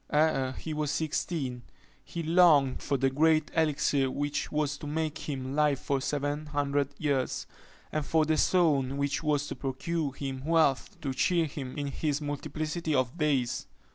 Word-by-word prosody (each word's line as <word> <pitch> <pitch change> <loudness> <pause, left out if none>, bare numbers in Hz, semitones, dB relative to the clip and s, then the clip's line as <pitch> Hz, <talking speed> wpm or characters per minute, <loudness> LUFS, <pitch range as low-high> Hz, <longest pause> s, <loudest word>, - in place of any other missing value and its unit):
Ere 140 -4 +2
he 155 +4 -5
was 150 -1 -1
sixteen, 145 -5 -2 0.4
he 170 - -5
longed 160 -5 +5
for 140 - 0
the 135 0 +2
great 155 +2 +3
elixir 145 -4 +2
which 145 +2 -2
was 150 -1 0
to 145 - -8
make 155 +1 -3
him 130 -2 -3
live 150 -1 +3
for 135 +1 -1
seven 145 +2 -2
hundred 145 -1 0
years, 140 -4 -1 0.5
and 155 - -1
for 160 +2 +2
the 155 +1 +2
stone 145 -6 +2
which 140 0 0
was 150 -2 +1
to - - -5
procure 145 +3 -2
him 135 -2 -5
wealth 160 +3 +2
to 140 -4 -2
cheer 170 +5 +2
him 140 -4 -6
in 145 - -2
his 145 +1 -1
multiplicity 155 +2 -3
of 130 +1 +1
days. 130 -5 0
145 Hz, 165 wpm, -29 LUFS, 135-155 Hz, 0.5 s, longed